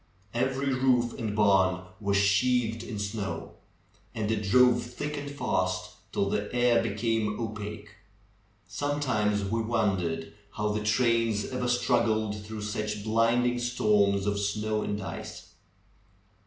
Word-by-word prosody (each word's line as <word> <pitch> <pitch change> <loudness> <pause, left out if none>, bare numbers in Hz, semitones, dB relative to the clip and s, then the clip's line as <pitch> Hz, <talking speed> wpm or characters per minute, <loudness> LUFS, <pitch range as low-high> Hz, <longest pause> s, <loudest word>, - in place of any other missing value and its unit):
Every 135 +3 0
roof 125 -2 +2
and 110 -3 -2
barn 95 -3 +3 0.2
was 100 -2 +1
sheathed 115 +3 +2
in 115 -2 -6
snow. 100 -4 -4 0.6
And 110 -1 -1
it 110 -2 0
drove 120 +4 +4
thick 145 +5 -5
and 145 0 -5
fast, 90 -9 -1 0.2
till 100 - 0
the 105 +1 -2
air 120 -1 +4
became 115 -2 -1
opaque. 105 -2 -6 0.7
Some 145 +9 -2
times 105 -7 +1
we 115 +4 -1
w'ondered 95 -8 -1 0.2
how' 105 0 -1
the 105 0 -1
trains 115 -1 +2
ever 125 -1 -2
struggled 115 -4 +1
through 105 0 -6
such 105 0 -3
blinding 115 +3 +2
storms 105 -5 +2
of 100 0 0
snow 105 +1 -1
and 105 0 -2
ice. 95 - -8
110 Hz, 130 wpm, -28 LUFS, 105-120 Hz, 0.7 s, drove